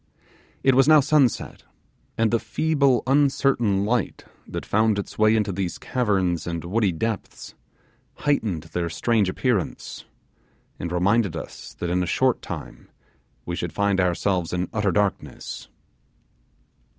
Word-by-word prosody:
It 135 - +5
was 135 +2 +4
now 155 -1 +8
sunset, 145 -3 +1 0.6
and 115 -1 +2
the 115 - +2
feeble 140 -5 +1
uncertain 135 -7 +2
light 115 -1 -1 0.2
that - - -5
found 110 0 +2
its 100 - -6
way 110 +1 +5
into 105 -2 +1
these 95 -2 -3
caverns 95 -9 0
and 85 -1 -4
woody 100 +2 +1
depths 110 +6 -4 0.6
heightened 110 - -1
their 85 +1 -3
strange 105 +3 +1
appearance, 100 - -2 0.7
and 85 - -4
reminded 95 +1 +2
us 80 - -8
that 85 -1 -3
in 90 +1 +1
a 90 - -1
short 130 +6 +1
time - - -8 0.6
we 85 - -3
should 85 -1 -4
find 100 -1 +1
ourselves 90 -1 0
in 90 0 -1
utter 105 -3 +1
darkness. 100 +3 -2
105 Hz, 135 wpm, -24 LUFS, 90-120 Hz, 0.7 s, now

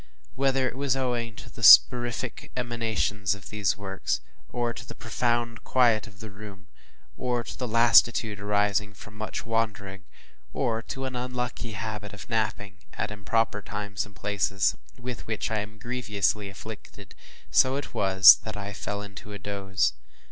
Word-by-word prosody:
Whether 135 -1 +1
it 125 - -5
was 135 -1 0
owing 120 -3 -2
to - - -11
the - - -12
soporific 120 0 +6
emanations 110 -4 -1
for - - -12
these 105 -1 0
works; 95 -2 -2 0.3
or 120 -1 -2
to - - -9
the - - -10
profound 120 -1 -1
quiet 120 -5 +3
of 100 -1 -15
the 110 -2 -8
room; 100 -2 -11 0.5
or 125 -1 -1
to - - -8
the 125 - -4
lassitude 115 -2 +4
arising 105 0 0
from 105 +2 -13
much 110 -2 -5
wandering; 105 -4 -2 0.5
or 115 -1 -1
to 135 +3 -6
an 130 -1 -4
unlucky 125 -2 -4
habit 105 0 -5
of 95 -4 -10
napping 105 -4 -2
at - - -3
improper 105 0 0
times 100 -1 -4
and 105 -1 -14
places, 100 -2 0 0.2
with 125 -1 -6
which 110 0 -2
I 110 - 0
am 105 +1 -7
grievously 105 -4 -1
afflicted, 100 0 -11 0.4
so 130 - +4
it 140 - -5
was, 95 0 +8
that 110 -1 -7
I 100 0 -5
fell 100 0 -4
into 100 0 -10
a - - -5
doze. 95 -7 -1
110 Hz, 160 wpm, -27 LUFS, 100-120 Hz, 0.5 s, was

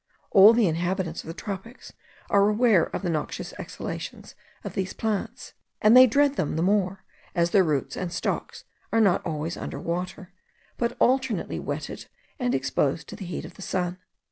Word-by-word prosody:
All 200 +1 +9
the 230 -2 +3
inhabitants 175 +1 -1
of - - -15
the 165 - -5
tropics 205 +6 -7 0.4
are 200 0 +5
aware 215 -5 +4
of - - -6
the 180 - 0
noxious 155 -2 -4
exhalations - - -7 0.3
of - - -6
these 190 -1 -2
plants; 215 -3 -3 0.3
and 215 +3 +6
they 255 0 +10
dread 280 +3 +2
them 150 - -1
the 160 - 0
more, 190 0 +1 0.3
as 170 0 +2
their 195 - +5
roots 150 -5 -1
and 180 -2 -4
stocks 170 - -3 0.3
are 225 - +3
not 200 -5 +3
always 160 -1 -3
under - - -5
water, 180 +2 -4 0.4
but 235 0 -2
alternately 260 -6 +1
wetted - - -5 0.3
and 250 -1 +1
exposed 135 +3 0
to - - -7
the 200 - -8
heat 175 - -5
of - - -10
the - - -14
sun. 180 -1 -2
190 Hz, 175 wpm, -26 LUFS, 170-220 Hz, 0.4 s, they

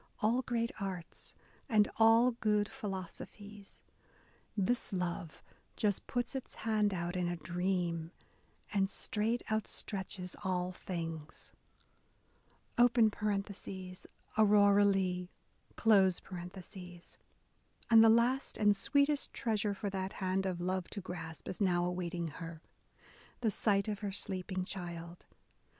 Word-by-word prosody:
All 230 +4 +3
great 235 -2 -1
arts, 190 -4 -5 0.3
and 215 -3 +5
all 225 +2 +6
good 210 -3 +1
philosophies, 205 -2 -8 0.7
This 210 +5 +1
love 175 -3 -3 0.3
just 205 -3 0
puts 245 +1 -1
its 265 -2 -5
hand 215 -2 +3
out 175 -1 -2
in 180 -1 0
a 175 - -1
dream 175 -1 -1 0.6
And 195 -1 +2
straight 220 +4 -1
outstretches 195 -3 -3
all 180 -1 0
things. 165 -4 -5 1.3
{Aurora 205 -2 +2
Leigh,) 185 -2 +1 2.7
And 225 - +10
the 225 - +8
last 240 +4 +3
and 205 -1 +4
sweetest 280 +7 +2
treasure 210 -3 0
for 200 +1 -3
that 190 0 -3
hand 190 0 0
of 180 -2 -2
love 185 0 -1
to 205 - -5
grasp, 165 -3 -7
is 185 - -5
now 175 -3 +3
awaiting 175 -1 -2
her, 165 +1 -8 0.4
— - - -25
the 225 -3 +2
sight 200 0 +2
of 210 -2 -2
her 205 -2 -3
sleeping 185 -1 -1
child. 175 -2 -7
195 Hz, 110 wpm, -34 LUFS, 180-215 Hz, 2.7 s, And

